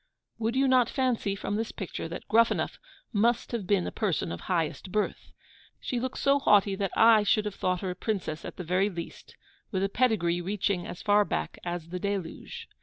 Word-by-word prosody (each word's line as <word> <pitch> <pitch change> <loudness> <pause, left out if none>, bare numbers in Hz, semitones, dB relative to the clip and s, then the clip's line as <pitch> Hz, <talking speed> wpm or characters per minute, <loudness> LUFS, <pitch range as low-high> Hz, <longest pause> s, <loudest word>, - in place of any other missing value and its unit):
Would 230 +2 -1
you 270 +1 +3
not 255 -2 +4
fancy, 250 -7 0
from 200 +1 -3
this 225 0 -2
picture, 185 -4 -5
that 165 - -7
Gruffanuff 230 +1 +2 0.3
must 230 +3 +2
have 225 -6 -3
been 195 -3 +2
a - - -3
person 175 - -1
of 85 - -6
highest 175 +1 -2
birth? 210 +1 -2 0.5
She 245 - -2
looks 260 +1 -3
so 280 0 +4
haughty 205 -6 +4
that 195 0 -1
I 225 -1 +7
should 210 +1 +2
have 210 - -3
thought 180 -2 -1
her 190 -2 -2
a - - -6
princess 185 -6 -3
at - - -8
the 180 - -4
very 185 +4 +1
least, 170 -4 -8 0.3
with 190 -3 -1
a 195 - +1
pedigree 195 -7 +1
reaching 190 -1 -1
as 175 - -8
far 205 0 +5
back 75 - -3
as 175 -2 -4
the 180 +1 -4
Deluge. 200 - -4
200 Hz, 200 wpm, -28 LUFS, 180-225 Hz, 0.5 s, I